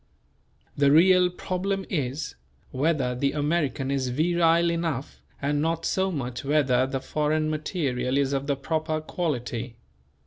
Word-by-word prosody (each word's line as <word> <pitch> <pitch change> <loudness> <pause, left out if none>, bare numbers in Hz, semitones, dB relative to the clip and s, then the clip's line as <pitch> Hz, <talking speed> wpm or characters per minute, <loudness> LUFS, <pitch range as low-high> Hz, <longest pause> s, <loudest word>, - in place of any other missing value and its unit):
The 140 -1 +4
real 180 +3 +6
problem 190 +2 -3
is: 140 -3 -3 0.4
Whether 135 -2 +1
the 140 +3 0
American 145 -3 0
is 135 -2 0
virile 170 +4 +3
enough 165 -6 -3 0.2
and 145 +1 0
not 165 +1 -1
so 190 0 +1
much 125 -6 -4
whether 135 -3 +2
the 135 0 -2
foreign 155 +2 0
material 140 -5 -1
is 140 -1 +1
of 140 0 -2
the 140 - +1
proper 155 +3 -2
quality. 125 -8 -3
150 Hz, 135 wpm, -26 LUFS, 135-165 Hz, 0.4 s, real